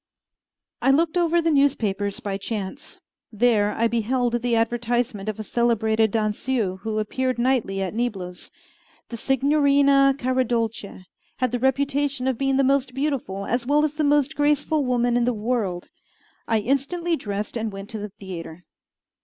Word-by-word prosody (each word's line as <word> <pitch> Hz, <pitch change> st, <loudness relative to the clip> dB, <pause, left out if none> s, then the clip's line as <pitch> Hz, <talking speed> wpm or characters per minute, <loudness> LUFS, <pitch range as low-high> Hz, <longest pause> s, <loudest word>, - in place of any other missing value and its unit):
I -, -, +3 dB
looked 315 Hz, +5 st, +3 dB
over 345 Hz, -1 st, +3 dB
the 330 Hz, -, +2 dB
newspapers 210 Hz, -9 st, +1 dB
by 195 Hz, -1 st, -4 dB
chance. 220 Hz, +8 st, -6 dB, 0.3 s
There 215 Hz, -2 st, +2 dB
I 230 Hz, -, +1 dB
beheld 240 Hz, +1 st, 0 dB
the 240 Hz, -1 st, +1 dB
advertisement 230 Hz, -2 st, -1 dB
of 215 Hz, -, -5 dB
a -, -, -3 dB
celebrated 220 Hz, -1 st, +1 dB
danseuse 215 Hz, -1 st, -1 dB
who 220 Hz, -1 st, -3 dB
appeared 255 Hz, +4 st, -1 dB
nightly 235 Hz, -6 st, 0 dB
at 190 Hz, -, -4 dB
Niblo's. 195 Hz, -7 st, -4 dB, 0.6 s
The 235 Hz, -, -6 dB
Signorina 275 Hz, +1 st, +3 dB
Caradolce 235 Hz, -7 st, -1 dB, 0.3 s
had 255 Hz, -2 st, 0 dB
the 245 Hz, -, -1 dB
reputation 275 Hz, +1 st, 0 dB
of 260 Hz, -3 st, -1 dB
being 270 Hz, -1 st, +1 dB
the 275 Hz, -, +3 dB
most 265 Hz, -1 st, +1 dB
beautiful 265 Hz, -9 st, -2 dB
as 240 Hz, 0 st, -1 dB
well 295 Hz, +2 st, +3 dB
as 300 Hz, -, -2 dB
the 305 Hz, 0 st, -1 dB
most 290 Hz, +1 st, +2 dB
graceful 295 Hz, +1 st, +1 dB
woman 245 Hz, -1 st, +1 dB
in 240 Hz, -1 st, +2 dB
the 245 Hz, -1 st, 0 dB
world. 210 Hz, -5 st, -2 dB, 0.6 s
I 225 Hz, -2 st, +2 dB
instantly 280 Hz, +8 st, 0 dB
dressed 205 Hz, -5 st, -4 dB
and 225 Hz, -2 st, -2 dB
went 195 Hz, +3 st, -8 dB
to 220 Hz, -, -5 dB
the 210 Hz, 0 st, -5 dB
theatre. 180 Hz, -4 st, -9 dB
240 Hz, 155 wpm, -23 LUFS, 215-275 Hz, 0.6 s, I